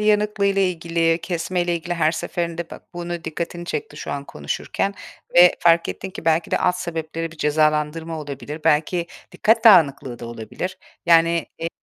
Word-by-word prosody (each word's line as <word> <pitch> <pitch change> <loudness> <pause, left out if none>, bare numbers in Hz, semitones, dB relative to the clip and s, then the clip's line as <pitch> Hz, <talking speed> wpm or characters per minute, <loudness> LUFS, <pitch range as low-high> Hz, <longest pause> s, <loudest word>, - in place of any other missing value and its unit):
yanıklığıyla 210 -2 +2
ilgili, 165 -2 +1
kesmeyle 175 0 -1
ilgili 175 +1 -4
her 165 -1 +2
seferinde 170 -1 -3
ba - - -9
bunu 175 -1 -5
dikkatini 170 +2 -4
çekti 150 -3 -5
şu - - -6
an 140 0 -4
konuşurken 110 - -3 0.4
ve 175 0 +8
fark 170 0 +4
ettin 190 - -5
ki 175 - -9
belki 165 0 +2
de - - +2
alt 180 -1 +2
sebepleri 165 -2 -4
bir 165 - -15
cezalandırma 155 +2 0
olabilir, 145 +1 -7
belki 170 +3 +2 0.3
dikkat 225 +2 +2
dağınıklığı 140 - +5
da 120 - -7
olabilir. 120 - -6 0.3
Yani, 170 0 +4
eee 165 - -2
165 Hz, 155 wpm, -22 LUFS, 155-175 Hz, 0.4 s, ve